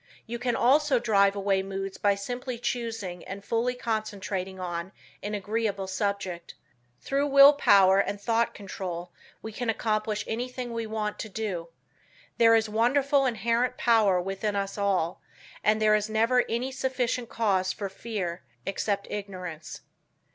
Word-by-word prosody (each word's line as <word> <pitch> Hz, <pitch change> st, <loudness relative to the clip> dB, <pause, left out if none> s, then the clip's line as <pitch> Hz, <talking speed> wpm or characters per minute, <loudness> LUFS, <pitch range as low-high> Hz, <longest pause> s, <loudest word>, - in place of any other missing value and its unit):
You 235 Hz, 0 st, -5 dB
can 240 Hz, -1 st, 0 dB
also 275 Hz, +3 st, +4 dB
drive 200 Hz, -4 st, +3 dB
away 195 Hz, -1 st, +1 dB
moods 195 Hz, 0 st, -5 dB
by 200 Hz, -1 st, +3 dB
simply 245 Hz, +5 st, -5 dB
choosing 225 Hz, -7 st, -4 dB
and 200 Hz, +1 st, -8 dB
fully 240 Hz, +2 st, 0 dB
concentrating 205 Hz, -5 st, -3 dB
on 175 Hz, +1 st, -4 dB, 0.3 s
an 210 Hz, +1 st, -3 dB
agreeable 205 Hz, -1 st, -2 dB
subject. 190 Hz, -3 st, -3 dB, 0.5 s
Through 280 Hz, +1 st, 0 dB
will 280 Hz, +1 st, +8 dB
power 195 Hz, -8 st, +5 dB
and 200 Hz, 0 st, -1 dB
thought 230 Hz, +2 st, 0 dB
control 180 Hz, -3 st, -6 dB, 0.3 s
we 220 Hz, -, -5 dB
can 235 Hz, +2 st, -3 dB
accomplish 215 Hz, -1 st, -1 dB
anything 245 Hz, +1 st, -4 dB
we 230 Hz, -1 st, -3 dB
want 215 Hz, -1 st, -3 dB
to 220 Hz, -, -5 dB
do. 195 Hz, -5 st, -4 dB, 0.7 s
There 230 Hz, -1 st, +7 dB
is 225 Hz, -1 st, +2 dB
wonderful 270 Hz, +5 st, +2 dB
inherent 235 Hz, +2 st, 0 dB
power 215 Hz, -6 st, +4 dB
within 195 Hz, +3 st, -2 dB
us 195 Hz, 0 st, -2 dB
all, 195 Hz, -5 st, 0 dB, 0.4 s
and 215 Hz, 0 st, +3 dB
there 215 Hz, 0 st, +4 dB
is 210 Hz, 0 st, +1 dB
never 230 Hz, +3 st, +3 dB
any 245 Hz, +3 st, -1 dB
sufficient 255 Hz, -2 st, -1 dB
cause 190 Hz, -4 st, +1 dB
for 200 Hz, +1 st, -4 dB
fear, 190 Hz, -4 st, -4 dB, 0.2 s
except 200 Hz, +1 st, -1 dB
ignorance. 180 Hz, -6 st, -6 dB
215 Hz, 145 wpm, -27 LUFS, 195-235 Hz, 0.7 s, will